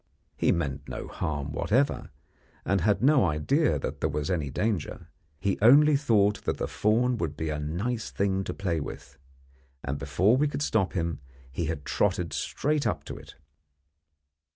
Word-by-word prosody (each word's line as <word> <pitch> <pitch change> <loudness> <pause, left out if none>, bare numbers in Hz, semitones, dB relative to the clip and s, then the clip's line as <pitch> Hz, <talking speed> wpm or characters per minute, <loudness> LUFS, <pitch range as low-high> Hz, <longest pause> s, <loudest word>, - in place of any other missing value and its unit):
He - - +2
meant 70 -4 -2
no - - -5
harm 75 -2 -3
whatever, 125 - 0 0.6
and 95 -1 +1
had 100 +2 +2
no 140 -1 +5
idea 95 - +1
that - - -5
there 80 - +1
was 75 +3 -2
any 80 -6 -1
danger. 100 +3 -2 0.3
He 100 +2 -1
only 145 +7 +7
thought 105 -7 +2
the - - -2
fawn 120 +4 +1
would 80 -3 -3
be 80 -1 -2
a 75 -1 -2
nice 100 +11 -3
thing 95 -1 0
to - - -3
play 85 -5 -1
with; 70 -1 -8 0.6
and 70 +1 -3
before 90 - +2
we 150 +2 +2
could 145 0 -3
stop 100 -9 +1
him 85 -4 -2 0.3
he 85 +6 -2
had 75 -2 -4
trotted 90 -5 0
straight 150 0 -1
up - - -2
to - - -7
it. - - -12
95 Hz, 165 wpm, -27 LUFS, 75-115 Hz, 0.6 s, only